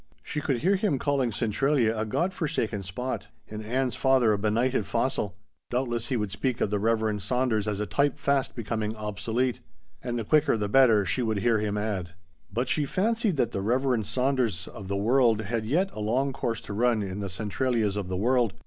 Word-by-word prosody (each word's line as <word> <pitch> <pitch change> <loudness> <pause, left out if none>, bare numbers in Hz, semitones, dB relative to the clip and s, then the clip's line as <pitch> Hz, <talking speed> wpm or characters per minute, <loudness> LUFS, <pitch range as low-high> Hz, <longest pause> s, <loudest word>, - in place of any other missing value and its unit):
She 150 - -3
could 135 -3 0
hear 190 +5 +3
him 190 -8 +1
calling 135 -3 0
Centralia 115 +2 +1
a 110 0 -1
God 175 - 0
forsaken 145 - -2
spot 110 +8 -4 0.2
and 110 0 -7
Ann's 125 +3 0
father 130 -5 +3
a - - +1
benighted 110 +1 +1
fossil. 105 -4 -1 0.3
Doubtless 120 -2 -1
he 125 - 0
would 105 -3 -2
speak 125 +5 -1
of 100 - 0
the 105 - +1
Reverend 110 -1 +1
Saunders 110 0 0
as 105 -1 -1
a 105 - -1
type 140 +11 +1
fast 140 -2 0
becoming 110 -1 -2
obsolete. 110 +4 -2 0.4
"And 120 -1 -3
the 115 - -2
quicker 150 +2 +3
the 105 -1 -1
better," 110 -3 +5
she 125 - 0
could 110 -2 0
hear 115 -1 +3
him 105 -1 -1
add. 95 -5 -3 0.4
But 120 +6 -1
she 150 - +1
fancied 205 +2 0
that 120 -3 +1
the 95 - -2
Reverend 125 0 +1
Saunderses 125 -7 0
of 100 - -9
the 100 +1 -1
world 115 +1 +3
had 110 +1 -3
yet 180 - +1
a - - -7
long 130 +6 0
course 115 -2 -2
to - - -7
run 115 0 +2
in 95 0 -5
the 100 -1 -3
Centralias 110 +2 -1
of 100 -3 -3
the 95 0 -2
world. 120 0 +2
115 Hz, 205 wpm, -27 LUFS, 105-130 Hz, 0.4 s, better